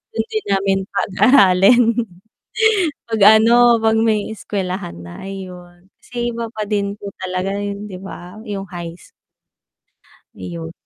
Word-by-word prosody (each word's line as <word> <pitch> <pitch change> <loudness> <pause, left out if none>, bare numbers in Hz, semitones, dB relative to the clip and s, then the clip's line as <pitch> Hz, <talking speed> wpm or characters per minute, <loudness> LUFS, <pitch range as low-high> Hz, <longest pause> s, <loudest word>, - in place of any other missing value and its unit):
dun - - -1
din 435 -1 -3
namin 195 0 +1
pag-aralin. 200 +1 +4 1.3
Pag 220 -2 -2 0.2
ano, 240 +1 +5
pag 220 0 +3
may 220 -1 0
eskuwelahan 190 - -5
na 85 - -10
ayun, 180 -2 -10
kasi 240 -1 -4
iba 230 0 -4
pa 215 -1 -4
din 200 -1 -1
po 200 - -7
talaga 185 +1 -3
'yon 205 0 -5
'di 185 - -7
ba 190 0 -10
yung 200 -2 -4
high. 170 -2 -7 1.4
Ayun. 85 -3 -7
200 Hz, 125 wpm, -19 LUFS, 185-220 Hz, 1.4 s, ano